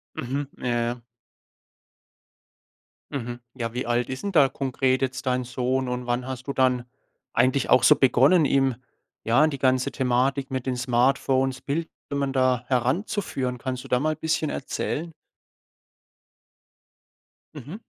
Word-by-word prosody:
Mhm. 140 +3 -3
Ja, 125 - -5
ja. 120 +1 -2 2.1
Mhm. 120 -3 -4 0.2
Ja, 115 -2 -3
wie 125 0 -3
alt 120 0 +1
is 130 0 -5
'n 200 - -2
da 145 -6 +5
konkret 130 -1 0
jetzt 130 0 -2
dein 125 0 +1
Sohn 125 +1 -1
und 125 0 -3
wann 125 +1 -1
hast 130 0 -6
du 140 - -2
dann 125 -2 +2 0.5
eigentlich 130 +1 +2
auch 130 - +6
so 150 +4 +7
begonnen, 140 +5 +4
ihm, 135 -2 +2 0.5
ja, 120 +7 +4
in 155 - +4
die 140 - -4
ganze 130 -1 +1
Thematik 130 +2 0
mit 130 -1 -3
den 125 -1 -1
Smartphones, 130 +1 +1
Bildschirmen 140 -2 -3
da 130 -2 +2
heranzuführen? 130 - -1
Kannst 130 0 -4
du - - -11
da 125 - +2
mal 155 +2 0
bisschen 160 -1 -1
erzählen? 160 +4 -3 2.4
Mhm. 150 - -8
130 Hz, 140 wpm, -25 LUFS, 125-140 Hz, 2.4 s, so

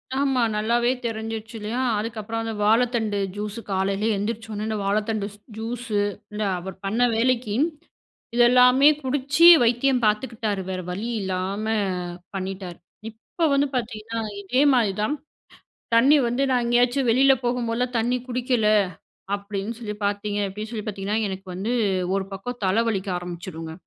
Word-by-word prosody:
ஆமா, 270 -2 +1
நல்லாவே 235 +3 +2
தெரிஞ்சிருச்சு 225 0 -4
இல்லயா! 215 +4 -3 0.2
அதுக்கப்பறம் 225 0 -4
அந்த 225 -1 -3
வாழத்தண்டு 225 -1 +2 0.2
ஜூஸு 210 +2 -5
காலையில 195 +1 0
எந்திரிச்சோனே 215 0 -4
இந்த 215 -1 -2
வாழத்தண்டு 210 +1 0 0.3
ஜூஸு, 225 -1 -3 0.4
இந்த 210 +1 -2 0.2
அவர் 190 +1 -7
பண்ண 220 +5 0
வேலைக்கி 235 -2 +1 0.8
இத 240 - +4
எல்லாமே 250 +2 +6 0.2
குடிச்சு 280 +5 +2 0.2
வைத்தியம் 245 +2 +2
பார்த்துக்கிட்டாரு. 215 -2 0
வேற 185 -1 -3
வழி 205 +6 -4
இல்லாம 190 +2 -2 0.7
பண்ணிட்டாரு. 185 -2 -5 0.3
இப்ப 235 +9 -3
வந்து 280 +1 +3
பார்த்தீங்கன்னா, 225 -1 -3 0.2
இதே 250 +7 +1
மாதிரி 225 -6 +2
தான் 250 +8 0 0.8
தண்ணீ 275 +6 +6
வந்து 245 +3 0
நான் 245 -2 +2
எங்கேயாச்சும் 245 +2 +2
வெளில 270 +3 +5
போகும்போதெல்லாம் 240 0 -1
தண்ணீ 240 +2 +1
குடிக்கல 245 -3 0 0.7
அப்பிடின்னு 205 +2 -5
சொல்லி 210 -3 -5
பார்த்தீங்க, 205 0 -1
அப்பிடி 210 +3 -6
சொல்லி 215 -3 -5
பார்த்தீங்கன்னா, 205 +1 -2
எனக்கு 190 0 -7
வந்து 215 +6 -2 0.4
ஒரு 195 -1 -1
பக்கம் 245 +6 -6
தல 195 +5 +2
வலிக்க 195 -3 -2
ஆரம்பிச்சிருங்க. 175 -2 -7
225 Hz, 135 wpm, -24 LUFS, 205-245 Hz, 0.8 s, எல்லாமே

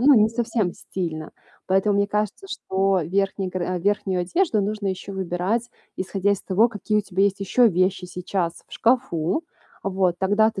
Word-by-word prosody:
ну, 280 +3 +7
не 215 -2 +5
совсем 225 -5 0
стильно. 160 -4 -5 0.3
Поэтому 195 +2 +2
мне 200 - +3
кажется, 210 - -2
что 195 - 0
верхний 195 +2 0
гар 185 -1 -3
а, 180 - -1
верхнюю 190 -1 0
одежду 220 - +1
нужно 210 0 -2
еще 190 +1 -4
выбирать 190 +6 -1 0.3
исходя 195 +1 0
из 200 - -2
того, 205 +5 +3
какие 210 -1 -1
у - - +3
тебя 195 0 +1
есть 200 0 0
еще 235 +5 +4
вещи 185 0 +1
сейчас 180 -1 -3
в - - -25
шкафу. 230 - +1 0.4
Вот 185 -2 +1
тогда 205 +3 +3
ты 205 -3 -7
195 Hz, 175 wpm, -23 LUFS, 185-215 Hz, 0.4 s, ну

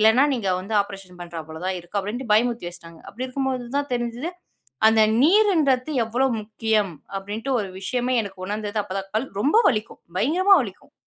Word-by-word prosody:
இல்லனா 220 +6 +6
நீங்க 210 -6 -2
வந்து 205 +4 -5
ஆப்ரேஷன் 195 -3 -11
பண்றா 170 -1 -6
போல 160 +1 -8
தான் 185 -1 -1
இருக்கும். 175 +4 -3
அப்டின்ட்டு 225 +4 -5
பயமுறுத்தி 230 -4 +1
வச்சிட்டாங்க. 170 -2 -12
அப்டி 255 +4 -5
இருக்கும்போது 260 -2 -2
தான் 285 -2 -3
தெரிஞ்சுது. 240 +7 -3 0.6
அந்த 220 0 +4 0.2
நீருன்றத்து 310 -7 +4
எவ்ளோ 245 +4 +1
முக்கியம் 215 -3 0 0.3
அப்டின்ட்டு. 210 +6 -4
ஒரு 195 - -5
விஷயமே 250 +5 0
எனக்கு 190 -2 -8
உணர்ந்தது 210 0 -2
அப்பதான். 195 0 -5
கல் 245 +5 0
ரொம்ப 295 - +3
வலிக்கும். 215 -3 -3 0.2
பயங்கரமா 370 - +5
வலிக்கும். - - -10
220 Hz, 165 wpm, -23 LUFS, 195-255 Hz, 0.6 s, இல்லனா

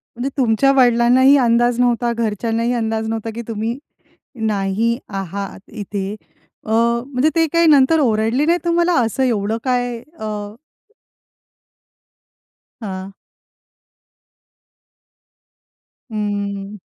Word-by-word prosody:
म्हणजे 245 +3 -3
तुमच्या 255 +2 +3
वडिलांनाही 250 +2 +5
अंदाज 240 +1 +2
नव्हता, 240 -1 +2
घरच्यांनाही 230 +1 -1
अंदाज 220 -1 -2
नव्हता 225 0 -3
की 235 - -4
तुम्ही 225 +2 -3 0.7
नाही 210 +3 0
आहात 195 0 -5
इथे 200 -2 -4 0.5
अ, - - -8
म्हणजे 235 +5 +1
ते 325 0 +4
काही 335 0 +4
नंतर 300 +1 +5
ओरडले 230 +2 +1
नाही 340 +2 +3
तुम्हाला? 345 +1 +2
असं 235 +3 -1
एवढं 220 -2 0
काय 245 -2 -1 0.2
अ 220 - -5 2.6
हां. 190 -1 -6 3.0
हम्म. 205 -1 -3
230 Hz, 95 wpm, -19 LUFS, 210-250 Hz, 3.0 s, वडिलांनाही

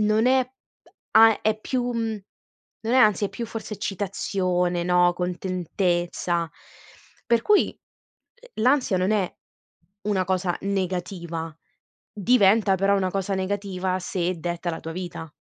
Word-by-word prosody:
non 215 +2 +3
è 260 0 +4
p 260 +1 -33 0.3
a 225 -1 +7
è 215 0 +1
più 245 +1 -1
mhmm, 225 -3 -2 0.6
non 230 +2 -1
è - - +5
ansia 210 -4 +4
è - - -14
più 230 +4 -5
forse 225 -1 -6
eccitazione, 185 -3 -1
no, 180 0 +4
contentezza. 175 -1 -1 0.8
Per 235 -1 +3
cui, 415 - +4 0.5
uhm, - - -12
l'ansia 255 -6 +3
non 185 +3 +1
è 200 -4 0 0.7
una 200 -3 0
cosa 185 -1 0
negativa, 180 -4 -3 0.6
diventa 205 -2 +4
però 195 +2 +2
una 190 -2 +1
cosa 195 +1 -2
negativa 190 -1 -2
se 180 0 -2
detta 175 +1 -3
la 160 - -3
tua 165 - -6
vita. 170 -3 -6
190 Hz, 135 wpm, -24 LUFS, 180-215 Hz, 0.8 s, a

